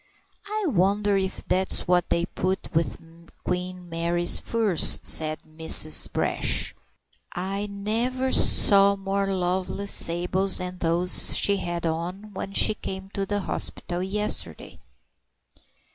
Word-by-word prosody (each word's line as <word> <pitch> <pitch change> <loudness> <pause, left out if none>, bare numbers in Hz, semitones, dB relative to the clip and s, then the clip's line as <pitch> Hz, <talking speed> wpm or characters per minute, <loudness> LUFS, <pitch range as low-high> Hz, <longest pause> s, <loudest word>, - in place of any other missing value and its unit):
"I 425 0 -4
wonder 200 - 0
if 190 -1 -4
that's 190 +1 -1
what 180 -1 +1
they 170 - 0
put 185 +1 -4
with 165 +1 -2 0.4
Queen 180 0 -5
Mary's 170 +1 0
furs," 220 -7 +2
said 155 -1 0
Mrs. 155 0 +6
Brash. - - -1 0.6
"I 195 +3 -4
never 235 +6 -3
saw 200 0 +5
more 195 0 -3
lovely 185 +1 -3
sables 185 +1 +1
than 180 0 -7
those 175 +2 +2
she 200 0 +2
had 175 -2 -5
on 180 +6 -5
when 195 +1 -7
she 215 - +3
came 190 -2 -8
to 195 -1 -4
the 205 0 -3
hospital 175 -1 -5
yesterday." 190 - -2
190 Hz, 120 wpm, -24 LUFS, 175-200 Hz, 0.6 s, Mrs